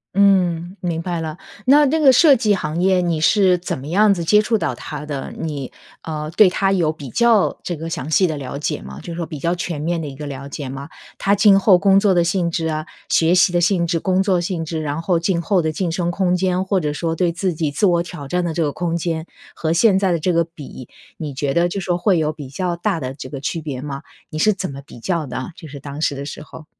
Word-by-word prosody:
嗯， 185 Hz, -3 st, +3 dB
明 170 Hz, -2 st, -2 dB
白 170 Hz, -1 st, -3 dB
了。 160 Hz, +1 st, -5 dB, 0.3 s
那 290 Hz, +3 st, +6 dB
那 315 Hz, +4 st, +1 dB
个 275 Hz, -3 st, +7 dB
设 280 Hz, +2 st, +6 dB
计 215 Hz, -4 st, +2 dB
行 165 Hz, -2 st, -3 dB
业 185 Hz, 0 st, +3 dB
你 170 Hz, -3 st, 0 dB
是 190 Hz, 0 st, +4 dB
怎 175 Hz, -, -4 dB
么 130 Hz, -, -9 dB
样 205 Hz, +5 st, +4 dB
子 175 Hz, -3 st, -3 dB
接 210 Hz, +5 st, +5 dB
触 225 Hz, +1 st, +1 dB
到 -, -, -1 dB
它 150 Hz, 0 st, -7 dB
的？ 145 Hz, -3 st, -5 dB
你， 145 Hz, -5 st, -4 dB, 0.3 s
呃， 155 Hz, -1 st, -5 dB
对 190 Hz, +2 st, +6 dB
它 195 Hz, +1 st, +1 dB
有 170 Hz, -5 st, +2 dB
比 145 Hz, -4 st, -9 dB
较 235 Hz, -, +3 dB
这 175 Hz, -, -3 dB
个 165 Hz, +1 st, -6 dB
详 150 Hz, -2 st, -4 dB
细 185 Hz, +4 st, +4 dB
的 160 Hz, -3 st, -1 dB
了 135 Hz, 0 st, -6 dB
解 145 Hz, -, -3 dB
吗， 70 Hz, +2 st, -9 dB
就 170 Hz, -, -7 dB
说 170 Hz, 0 st, -3 dB
比 155 Hz, -, -7 dB
较 170 Hz, +5 st, 0 dB
全 175 Hz, -3 st, -4 dB
面 170 Hz, +2 st, -1 dB
的 155 Hz, -, -5 dB
一 135 Hz, -, -8 dB
个 150 Hz, +2 st, -7 dB
了 140 Hz, -1 st, -6 dB
解 140 Hz, -1 st, -6 dB
吗？ 135 Hz, +1 st, -7 dB, 0.3 s
它 200 Hz, +1 st, +2 dB
今 195 Hz, -1 st, +6 dB
后 195 Hz, -2 st, +5 dB
工 195 Hz, +1 st, +4 dB
作 200 Hz, -2 st, +3 dB
的 175 Hz, -, +4 dB
性 175 Hz, 0 st, 0 dB
质 165 Hz, -1 st, -2 dB
啊、 155 Hz, 0 st, -2 dB, 0.2 s
学 165 Hz, +2 st, +3 dB
习 180 Hz, +1 st, +5 dB
的 175 Hz, 0 st, +1 dB
性 180 Hz, -1 st, +2 dB
质、 165 Hz, -1 st, 0 dB
工 185 Hz, +2 st, +1 dB
作 190 Hz, -3 st, +2 dB
性 170 Hz, -2 st, -3 dB
质， 160 Hz, 0 st, -3 dB
然 150 Hz, +1 st, -3 dB
后 175 Hz, -1 st, +2 dB
今 170 Hz, 0 st, 0 dB
后 185 Hz, +1 st, +2 dB
的 160 Hz, 0 st, -1 dB
晋 170 Hz, +1 st, -2 dB
升 175 Hz, +1 st, -1 dB
空 180 Hz, 0 st, +1 dB
间， 185 Hz, 0 st, 0 dB
或 190 Hz, 0 st, +1 dB
者 150 Hz, -3 st, -2 dB
说 165 Hz, +2 st, -2 dB
对 175 Hz, +1 st, +1 dB
自 180 Hz, +2 st, -1 dB
己 160 Hz, -1 st, -1 dB
自 145 Hz, +8 st, 0 dB
我 175 Hz, -2 st, +3 dB
挑 170 Hz, -5 st, -7 dB
战 180 Hz, +5 st, 0 dB
的 170 Hz, -2 st, -2 dB
这 165 Hz, -, 0 dB
个 145 Hz, -, 0 dB
空 170 Hz, +1 st, -2 dB
间， 165 Hz, -1 st, -2 dB, 0.3 s
和 160 Hz, -1 st, -1 dB
现 195 Hz, +1 st, +4 dB
在 190 Hz, -2 st, +1 dB
的 170 Hz, -, +1 dB
这 180 Hz, +3 st, 0 dB
个 170 Hz, -, +3 dB
比， 150 Hz, -6 st, -11 dB, 0.3 s
你 150 Hz, -3 st, -5 dB
觉 140 Hz, -1 st, -1 dB
得 170 Hz, +3 st, +3 dB
就 195 Hz, -, -3 dB
说 175 Hz, -1 st, -1 dB
会 190 Hz, 0 st, +2 dB
有 155 Hz, -1 st, +1 dB
比 145 Hz, -4 st, -9 dB
较 175 Hz, +5 st, -2 dB
大 170 Hz, -1 st, -1 dB
的 130 Hz, -1 st, -4 dB
这 135 Hz, -1 st, -9 dB
个 140 Hz, -, -6 dB
区 160 Hz, +4 st, -3 dB
别 140 Hz, -4 st, -5 dB
吗？ 140 Hz, 0 st, -5 dB, 0.3 s
你 155 Hz, -, -5 dB
是 215 Hz, +6 st, +4 dB
怎 185 Hz, -5 st, -5 dB
么 140 Hz, -, -8 dB
比 120 Hz, -, -13 dB
较 165 Hz, +2 st, -2 dB
的， 130 Hz, +6 st, -5 dB
就 165 Hz, -, -11 dB
是 140 Hz, -1 st, -9 dB
当 140 Hz, +2 st, -7 dB
时 145 Hz, -, +1 dB
的 140 Hz, +1 st, -6 dB
时 145 Hz, -, -7 dB
候？ 155 Hz, +1 st, -12 dB
170 Hz, 285 characters per minute, -20 LUFS, 150-185 Hz, 0.3 s, 个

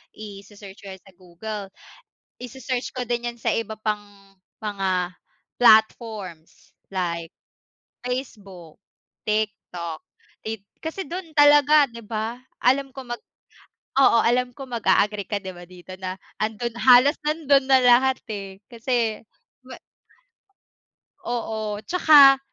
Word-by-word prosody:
Ise-search 200 Hz, -1 st, -11 dB
ko -, -, -10 dB
'yan 190 Hz, -1 st, -12 dB
sa 195 Hz, -, -18 dB
Google. 195 Hz, +3 st, -8 dB, 0.7 s
Ise-search 250 Hz, 0 st, -4 dB
ko 250 Hz, -, -1 dB
din 240 Hz, 0 st, -1 dB
'yan 235 Hz, -, -18 dB
sa -, -, +1 dB
iba 225 Hz, -1 st, -3 dB
pang 215 Hz, -1 st, -1 dB, 0.6 s
mga 190 Hz, -4 st, -2 dB, 0.5 s
platforms, 215 Hz, -7 st, +2 dB, 0.2 s
like 170 Hz, -3 st, -2 dB, 0.8 s
Facebook, 200 Hz, -, -6 dB, 0.5 s
TikTok, 190 Hz, -6 st, -3 dB, 0.4 s
ti 220 Hz, -2 st, -5 dB, 0.2 s
kasi 325 Hz, +4 st, -4 dB
dun 350 Hz, +2 st, -6 dB
talaga, 290 Hz, 0 st, +6 dB
'di 235 Hz, 0 st, -11 dB
ba? 220 Hz, +2 st, -4 dB, 0.2 s
Alam 270 Hz, +2 st, +3 dB
ko 265 Hz, -1 st, -8 dB
mag 240 Hz, 0 st, -5 dB, 0.8 s
oo. 255 Hz, -4 st, +6 dB
Alam 245 Hz, +1 st, +1 dB
ko 270 Hz, -2 st, -9 dB
mag-a-agree 210 Hz, -2 st, +1 dB
ka 205 Hz, -, -1 dB
'di 190 Hz, -1 st, -6 dB
ba 175 Hz, -, -11 dB
dito 180 Hz, +1 st, -12 dB
na 185 Hz, 0 st, -5 dB, 0.2 s
'andun 220 Hz, +2 st, -2 dB
halos 255 Hz, +4 st, +6 dB
nandun 295 Hz, -3 st, +2 dB
na 265 Hz, -, +7 dB
lahat, 255 Hz, +2 st, +5 dB
eh. 195 Hz, -2 st, -7 dB
Kasi 235 Hz, -2 st, -1 dB, 0.5 s
ma 255 Hz, -, -9 dB, 1.4 s
Oo, 220 Hz, -3 st, -4 dB
tsaka 290 Hz, -6 st, +7 dB
220 Hz, 120 wpm, -23 LUFS, 195-255 Hz, 1.4 s, na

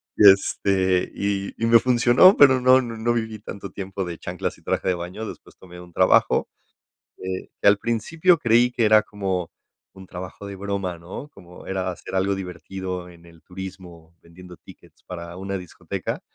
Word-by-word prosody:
Y 105 Hz, -2 st, +8 dB
este, 95 Hz, -1 st, 0 dB
y 100 Hz, -1 st, -2 dB
y -, -, +2 dB
me 115 Hz, 0 st, +7 dB
funcionó, 125 Hz, -, +5 dB
pero 130 Hz, -3 st, +6 dB
no 130 Hz, +1 st, +6 dB
no 115 Hz, -2 st, -6 dB
no 120 Hz, +2 st, 0 dB
viví 110 Hz, -2 st, -3 dB
tanto 100 Hz, -2 st, -9 dB
tiempo 95 Hz, -1 st, -5 dB
de 85 Hz, -2 st, -6 dB
chanclas -, -, -4 dB
y -, -, -27 dB
traje -, -, -2 dB
de 90 Hz, -, +1 dB
baño. 90 Hz, +6 st, -6 dB
Después -, -, -12 dB
tomé 90 Hz, -1 st, -13 dB
un 90 Hz, -, -14 dB
trabajo 95 Hz, -, +3 dB, 0.7 s
que 95 Hz, 0 st, -6 dB
que -, -, -2 dB
al 100 Hz, -, +5 dB
principio 160 Hz, -, +1 dB
creí 120 Hz, -2 st, +3 dB
que 120 Hz, -, 0 dB
era 110 Hz, 0 st, +6 dB
como 95 Hz, -5 st, -4 dB, 0.4 s
un 95 Hz, 0 st, -13 dB
trabajo 90 Hz, +3 st, -9 dB
de 100 Hz, -, -7 dB
broma, 100 Hz, -3 st, -4 dB
¿no? 90 Hz, -, -9 dB
Como 90 Hz, -2 st, -15 dB
era 95 Hz, -1 st, -2 dB
hacer 90 Hz, -, -9 dB
algo 95 Hz, +1 st, +1 dB
divertido 90 Hz, 0 st, -6 dB
en 85 Hz, -1 st, -17 dB
el 85 Hz, -1 st, -18 dB
turismo, 90 Hz, -3 st, -10 dB
vendiendo 90 Hz, +1 st, -14 dB
tickets 85 Hz, -4 st, -18 dB
para 85 Hz, -1 st, -8 dB
una 95 Hz, +1 st, -4 dB
discoteca. 90 Hz, -2 st, -6 dB
95 Hz, 180 wpm, -23 LUFS, 90-110 Hz, 0.7 s, Y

